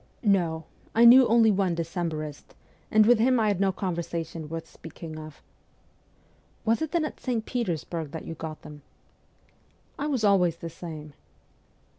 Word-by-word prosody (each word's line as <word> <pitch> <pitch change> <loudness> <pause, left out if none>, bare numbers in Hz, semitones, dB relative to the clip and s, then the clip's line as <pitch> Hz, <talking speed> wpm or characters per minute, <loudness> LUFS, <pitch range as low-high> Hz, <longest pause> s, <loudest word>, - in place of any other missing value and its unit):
' - - -38 0.2
No; 160 -2 -3 0.3
I 230 +1 +6
knew 250 +2 +9
only 225 -1 +5
one 190 -3 +1
Decembrist, 165 -3 -4 0.3
and 215 0 +5
with 240 0 +5
him 250 +2 +3
I 215 -1 +2
had 200 -3 0
no 195 -1 +2
conversation 170 -4 -4
worth 165 0 -6
speaking 160 -1 -10
of.' 155 -1 -11 0.6
' - - -36
Was 230 +5 +2
it 315 - -1
then 340 -3 +1
at - - -7
St. 235 -4 -2
Petersburg 170 - -3
that 160 +1 -7
you - - -5
got 160 -1 -7
them? 150 -1 -11 0.4
' - - -37
' - - -29
I 290 - -1
was 265 -7 -1
always 185 -5 +4
the 165 0 -8
same.' 155 -3 -9
175 Hz, 175 wpm, -27 LUFS, 160-225 Hz, 0.6 s, knew